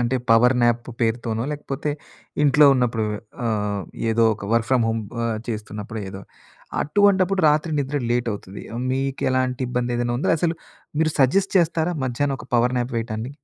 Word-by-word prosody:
అంటే 120 +2 +1
power 125 +3 +6
nap 120 +1 +1
పేరుతోనో, 115 -1 0
లేకపోతే 145 0 -4 0.5
ఇంట్లో 145 +1 +6
ఉన్నప్పుడు 115 -3 0 0.4
ఆహ్, 105 -2 -1 0.3
ఏదో 115 +1 +3
ఒక 100 -1 -8
వర్క్ 115 -1 +2
ఫ్రం 125 -3 +4
హోమ్ 115 0 -1 0.2
ఆహ్, 110 -2 -1
చేస్తున్నప్పుడు 105 0 -5
ఏదో 95 0 -8 0.6
అటువంటప్పుడు 195 +1 +3
రాత్రి 155 +2 +1
నిద్ర 140 +1 -1 0.2
లేట్ 120 -1 0
అవుతది. 100 -1 -8 0.3
మీకెలాంటి 130 -1 0
ఇబ్బంది 125 0 -1
ఏదైనా 120 0 -1
ఉందా? - - 0
అసలు 165 0 +1 0.5
మీరు 160 0 +3
సజెస్ట్ 190 +10 +3
చేస్తారా 170 0 +1
మధ్యాహ్నం 135 +2 -1
ఒక - - -12
పవర్ 125 +2 +2
న్యాప్ 120 0 -3
వేయటాన్ని? 115 +3 -4
125 Hz, 150 wpm, -22 LUFS, 115-145 Hz, 0.6 s, పవర్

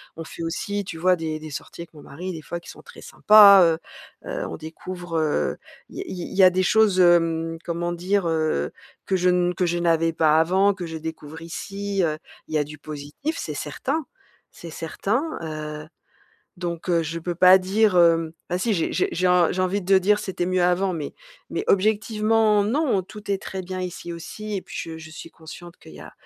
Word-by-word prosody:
on 165 - -7
fait 165 - -8
aussi, 205 +5 -3
tu 180 -4 -7
vois 185 +2 +4
des 160 -2 -4
des 155 0 -9
sorties 150 - -8
avec 170 - -11
mon 150 - -12
mari 180 +6 -7
des 160 - -7
fois 175 - -5
qui 170 - -14
sont - - -11
très - - -14
sympas. 200 -3 +7
Heu 165 -1 +3 0.5
heu, - - -4
on - - -6
découvre, 170 +2 -6
heu, 155 -2 0 0.3
il - - -12
y - - -3
a - - -3
il 185 - -6 0.2
il - - -7
y 195 - +6
a 185 - +9
des 185 +1 +1
choses, 210 -1 +3
hem, 165 -2 +3
comment 175 0 -3
dire? 180 +2 0
Heu, 155 - 0 0.3
que 190 - 0
je 180 0 +2
ne 180 0 +2
que 180 - 0
je 175 0 0
n'avais 165 -1 +2
pas 155 -1 +3
avant, 190 +5 +3
que 185 -2 -6
je 160 0 -6
découvre 160 0 -8
ici, 195 +4 -4
heu. 155 -2 0 0.3
Il - - -9
y - - +4
a 150 - +2
du 150 +1 -10
positif, 150 - -6
c'est - - -4
certain, 300 +3 -3 0.5
c'est 170 - -11
certain. 220 - -2 0.5
Heu, - - -15 0.7
donc, 175 -1 -5
heu, 170 -1 +2
je 165 +2 -4
peux 175 +1 -4
pas 185 +2 +8
dire 200 +2 +2
hem, 165 -2 +4 0.2
bah, 180 - 0
si 225 +4 0
j'ai 165 - -1
j'ai - - +1
j'ai 180 +1 +1
en 180 -2 +4
j'ai 185 - -1
envie 190 +2 0
de 190 +1 +4
dire: 205 +3 +2
«C'était 190 -4 -3
mieux 185 0 +1
avant» 180 +2 +2
mais 160 -4 -5 0.4
mais - - -2
objectivement 215 +1 +2
non, 245 -3 +1
tout 210 +2 -10
est 195 - +1
très 190 -1 -6
bien 185 +1 -5
ici 180 -1 -6
aussi 210 +5 -6
et 190 - -4
puis - - -13
je 160 -1 -6
je 160 0 -11
suis 155 - -10
consciente 170 +2 -12
qu'il - - -15
y - - -11
a - - -11
180 Hz, 220 wpm, -23 LUFS, 165-195 Hz, 0.7 s, a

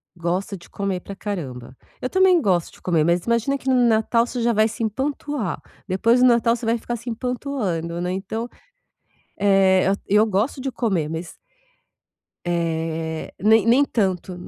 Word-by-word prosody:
gosta 180 +4 -2
de 170 - -14
comer 195 -2 -2
pra 200 +2 -9
caramba. 135 - -6 0.3
Eu 255 - -2
também 375 -2 +4
gosto 180 - +1
de - - -18
comer, 165 -4 +1
mas 170 +1 +1
imagina 235 +4 +1
que 265 - -12
no 260 - +4
Natal 230 +1 +2
você 245 - -4
já 235 0 +2
vai 215 +1 +3
se 225 +1 -5
empanturrar, 265 - -2 0.3
depois 230 +6 +3
do 255 - +7
Natal 235 -1 +3
você 240 - -7
vai 230 +1 +2
ficar 240 +1 -4
se 235 +1 -7
empanturrando, 225 - -3
né? 180 +1 -2
Então, 220 +5 -4 0.9
eh, 195 -2 +4
at 200 +1 +1
eu 210 +2 +4
gosto 220 +6 -1
de 270 0 -3
comer, 185 -12 -1
mas 165 +2 -6 1.1
eh, 165 -2 -2
nem 220 +1 +5
nem 260 +5 +5
tanto, 190 -6 -1
205 Hz, 170 wpm, -22 LUFS, 175-235 Hz, 1.1 s, do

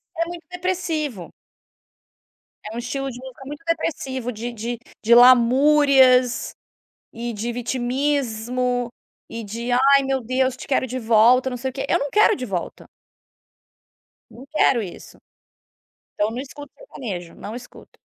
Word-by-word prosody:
É 335 0 0
muito 345 -1 -8
depressivo. 330 - -3 1.4
É 215 +1 -7
um - - -3
estilo 270 +3 -4
de 245 - -8
música 260 0 -11
muito 295 +3 -8
depressivo, 270 -7 -2
de 235 +2 -5
de 235 +1 -5 0.2
de 235 +2 +5
lamúrias, 255 +1 +5 0.6
e 235 0 -5
de 225 +3 -3
vitimismo 245 -1 -1 0.4
e 230 0 -6
de: 230 +4 -5
"Ai 275 +2 +5
meu 270 -1 -1
Deus, 255 +2 0
te - - -10
quero 260 -1 +1
de 255 +1 -5
volta, 235 +3 +4
não 250 - -5
sei 265 +2 -3
o - - -27
quê", 270 0 -3
eu - - +3
não 285 - -3
quero 425 +1 +4
de 255 - -5
volta. 185 -5 -5 1.4
Não 255 +3 -13
quero 270 -6 +3
isso. 180 - -11 1.0
Então 210 +1 0
não 235 - -6
escuto 285 +1 -10
sertanejo, 205 - -7
não 210 - -8
escuto. 245 - -14
255 Hz, 145 wpm, -22 LUFS, 235-275 Hz, 1.4 s, de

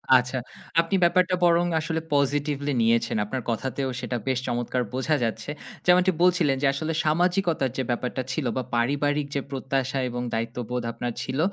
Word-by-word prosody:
আচ্ছা, 125 +1 +2 0.4
আপনি 170 +4 -1
ব্যাপারটা 180 +1 +4
বরং 170 0 +4
আসলে 160 0 -2
পজিটিভলি 145 0 +1
নিয়েছেন। 115 0 +2
আপনার 130 +5 -3
কথাতেও 130 +3 -2
সেটা 125 -1 -3
বেশ 130 -1 +1
চমৎকার 120 +1 -1
বোঝা 130 +4 +1
যাচ্ছে। 115 +4 -3 0.4
যেমনটি 180 +1 +5
বলছিলেন 175 -6 +4
যে 145 - +3
আসলে 160 +3 -2
সামাজিকতার 170 -3 +2
যে 130 - 0
ব্যাপারটা 125 +2 -1
ছিল 135 0 -2
বা 130 - 0
পারিবারিক 145 +4 +1
যে 140 - +1
প্রত্যাশা 135 0 -1
এবং 120 0 -4
দায়িত্ববোধ 120 +2 -2
আপনার 120 +1 -4
ছিল, 130 +2 -3
135 Hz, 155 wpm, -25 LUFS, 125-160 Hz, 0.4 s, যেমনটি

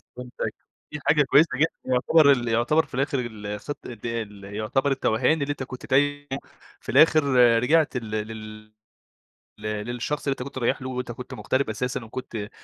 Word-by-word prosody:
فهمتك 125 0 -5 0.4
دي 150 - -5
حاجة 150 -1 +5
كويسة 145 +4 +5
جدًا، 160 +4 +4 0.2
يعتبر 140 +4 +5
ال 125 -3 +1
يعتبر 120 +8 +2
في - - -25
الآخر 135 +1 0
ال 110 -4 -6
الخ 105 +7 -5
ال 115 -3 -5
يعتبر 110 +8 -1
التوهان 135 +4 +1
اللي 140 +1 -1
أنت 145 -2 -4
كنت 130 -1 -9
تايهُه 145 +2 +1 0.5
في - - -11
الآخر 155 -1 +6 0.4
رجعت 155 0 +3
لل 115 -3 -6 0.2
لل 110 -1 -9 0.9
ل - - -16
للشخص 120 +7 -3
اللي - - +3
أنت 125 - -6
كنت 140 0 -9
رايح 120 0 0
له، 130 - -5
وأنت 125 -1 -4
كنت 125 +2 -8
مغترب 130 -3 -1
أساسًا 125 +4 -3
و - - -14
كنت 110 -4 -6
125 Hz, 175 wpm, -25 LUFS, 110-140 Hz, 0.9 s, الآخر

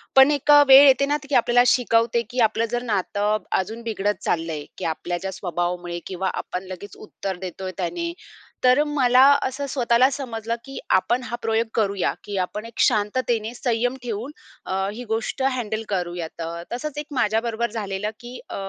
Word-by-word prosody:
पण 265 +2 +8
एक 290 0 +2
अ, 290 0 +9
वेळ 270 +2 +10
येते 270 +1 +5
ना 290 +1 +1
त - - -12
की 285 - +1
आपल्याला 245 +1 +4
शिकवते 235 -1 +3
की 250 0 -4
आपलं 225 +1 -1
जर 240 - -1
नातं 210 -1 0 0.2
अजून 220 +5 -7
बिघडत 205 -3 -1
चाललंय 160 -3 -2
की - - -5
आपल्या 175 +2 -2
ज्या 190 +2 -5
स्वभावामुळे 175 -1 -3
किंवा 190 0 -2
आपण 180 - -4
लगेच 190 +2 -9
उत्तर 195 -3 -6
देतोय 185 +1 -5
त्याने, 335 - -2 0.5
तर 255 +3 +5
मला 255 -4 +4 0.2
असं 265 +2 -3
स्वतःला 250 -1 +3
समजलं 230 -5 -4
की 270 - -9 0.2
आपण 240 +6 0
हा 240 - -4
प्रयोग 225 0 0
करूया 200 -4 +1
की 205 -1 -5
आपण 210 +4 -3
एक 230 - -11
शांततेने 220 +1 +1
संयम 245 +1 0
ठेवून 235 +3 -4 0.3
अ, 190 - -3 0.2
ही 240 +3 -7
गोष्ट 225 +4 -3
हँडल 225 -3 -3
करूयात. 175 -3 -3
अ, 170 +1 -5
तसंच 295 +4 -5
एक 295 - -3
माझ्याबरोबर 230 -2 0
झालेलं 210 -2 -3
की 245 +1 -9
अ, - - -6
225 Hz, 175 wpm, -23 LUFS, 190-250 Hz, 0.5 s, वेळ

